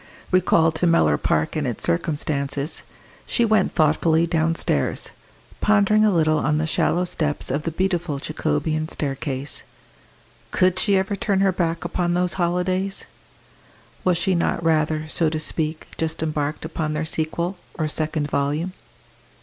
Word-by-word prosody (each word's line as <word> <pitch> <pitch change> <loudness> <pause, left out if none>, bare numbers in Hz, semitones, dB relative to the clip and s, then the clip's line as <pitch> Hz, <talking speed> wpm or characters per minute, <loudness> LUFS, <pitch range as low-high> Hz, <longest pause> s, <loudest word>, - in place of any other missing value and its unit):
Recalled 165 -3 +4
to 165 +2 +1
Mellor 80 - +4
Park 75 0 0
and - - -1
its - - -4
circumstances, 140 - -1 0.5
she 235 - +2
went 215 -3 +2
thoughtfully 160 +1 +3
downstairs, 165 -1 0 0.5
pondering 215 0 +4
a 215 - +5
little 155 -3 +3
on 150 +1 +1
the 155 - 0
shallow 175 +2 +1
steps 150 -6 -1
of 140 +3 0
the 165 - -3
beautiful 175 -3 -1
Jacobean 155 +1 -1
staircase. 140 -1 -3 0.9
Could 185 0 +2
she 200 -2 +3
ever 190 +2 0
turn 200 -2 0
her 195 -1 +4
back 170 -2 -1
upon 175 0 0
those 180 0 +2
holidays? 185 +2 0 1.0
Was 180 -2 +3
she 190 +2 +1
not 170 -1 0
rather, 155 -1 +1
so 160 0 +2
to 155 0 -2
speak, 155 0 -3
just 160 0 -2
embarked 150 0 -2
upon 160 -1 -2
their 150 +1 -1
sequel, 170 +4 -2 0.2
or 155 - -1
second 155 -1 -1
volume? 145 +6 -1
160 Hz, 145 wpm, -23 LUFS, 155-180 Hz, 1.0 s, a